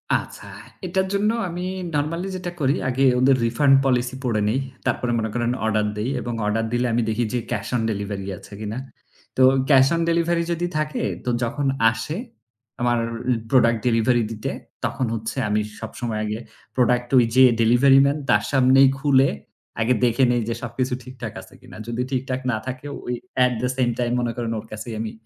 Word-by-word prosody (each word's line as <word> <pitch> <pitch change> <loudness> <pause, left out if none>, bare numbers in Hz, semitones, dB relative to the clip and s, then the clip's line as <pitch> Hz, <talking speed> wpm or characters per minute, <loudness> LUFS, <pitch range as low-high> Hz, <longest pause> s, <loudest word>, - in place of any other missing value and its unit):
আচ্ছা, - - -5 0.4
এটার 190 +2 0
জন্য 200 +2 +2 0.2
আমি 175 +1 -5 0.3
নরম্যালি 165 +5 -1
যেটা 180 -1 -4
করি, 140 0 +2
আগে 130 +2 0 0.2
ওদের 130 +1 +5
রিফান্ড 135 +4 +3
পলিসি 125 -1 +1
পড়ে 115 -4 0
নেই। 130 +5 +1 0.3
তারপরে 120 -1 0
মনে 110 -1 -1
করেন, 120 0 0
অর্ডার 110 -1 +1
দেই 110 +5 -1
এবং 120 - -4
অর্ডার 110 +2 0
দিলে 120 +1 +1
আমি 120 - +2
দেখি 115 +2 0
যে, 125 - +1
ক্যাশ - - -2
অন 120 - +1
ডেলিভারি 100 -1 -4
আছে - - -14
কিনা। 110 +2 -4 0.6
তো - - +3 0.3
ক্যাশ 135 -2 +6
অন 165 - 0
ডেলিভারি 170 0 +1
যদি 170 +1 -1
থাকে, 155 0 -2 0.2
তো - - 0
যখন 135 +4 -1 0.2
আসে, 115 +9 -4 0.6
আমার 120 0 +2 0.5
প্রোডাক্ট 120 -3 +4
ডেলিভারি 120 +1 +3
দিতে, 110 -1 -4 0.4
তখন 130 - -1
হচ্ছে 115 +4 -5
আমি 105 +1 +2 0.2
সব 110 - -6
সময় 115 -3 -2
আগে 105 +1 -3 0.4
প্রোডাক্ট 125 -1 +2
ওই 120 - +6
যে 130 - +7 0.2
ডেলিভারি 130 +4 +5
ম্যান, 140 +2 +1
তার 105 0 +4
সামনেই 135 0 +6
খুলে 135 -1 +4 0.5
আগে 115 +3 +3
দেখে 120 +2 +2
নেই 120 -1 +1
যে, - - 0
সবকিছু 125 +2 -2
ঠিকঠাক 130 -1 -8
আছে - - -16
কিনা। - - -13
যদি 120 +1 -2
ঠিকঠাক 130 0 -2
না 110 - 0
থাকে 130 +2 -6 0.2
ওই, 125 - -2 0.3
এট 125 - +1
দ্য 125 - +1
সেইম 125 -2 +1
টাইম 120 -1 0
মনে 120 -1 -1
করেন, 115 -1 -2
ওর 105 - -10
কাছেই 110 +2 -6
আমি 110 -1 -3
125 Hz, 185 wpm, -23 LUFS, 115-135 Hz, 0.6 s, যে